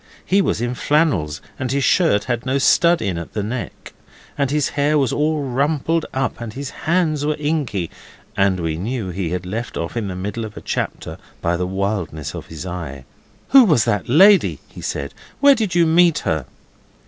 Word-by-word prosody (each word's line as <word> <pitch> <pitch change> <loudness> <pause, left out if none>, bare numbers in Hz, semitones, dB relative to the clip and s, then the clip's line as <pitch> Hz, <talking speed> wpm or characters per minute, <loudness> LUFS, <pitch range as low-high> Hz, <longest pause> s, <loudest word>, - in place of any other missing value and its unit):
He 195 +2 +3
was 140 - -1
in 120 +1 -1
flannels, 120 - +1 0.2
and 130 -2 -2
his 140 0 0
shirt 160 - +3
had 120 -2 -2
no 130 +1 0
stud 170 +4 +4
in 95 -5 -2
at 85 - -9
the 105 - -2
neck, 115 -1 -6 0.4
and 140 -2 0
his 150 0 +1
hair 150 +1 +1
was 135 -5 +1
all 150 0 0
rumpled 145 +5 0
up 135 -2 -2
and 115 -2 -6
his 135 +2 -6
hands 160 -3 0
were 150 +1 0
inky, 145 - -2 0.4
and 95 -2 +2
we 80 -2 -2
knew 110 +2 -3
he 90 -1 -3
had 90 +1 -3
left 110 +6 -4
off 85 +5 -4
in 115 -4 -2
the 95 - -5
middle 105 +5 -4
of 105 -2 -8
a - - -7
chapter - - -4 0.2
by 85 +1 0
the 90 +1 -2
wildness 95 -6 -3
of - - -8
his 80 +2 -8
eye. 80 -7 -6 0.4
'Who 270 -1 +8
was 150 - +3
that 105 0 -1
lady?' 190 +9 +6
he - - -12
said. - - -4 0.3
'Where 285 0 +7
did 215 -8 -1
you 170 -1 +5
meet 165 0 +4
her? 80 -5 -1
120 Hz, 195 wpm, -20 LUFS, 95-155 Hz, 0.4 s, Who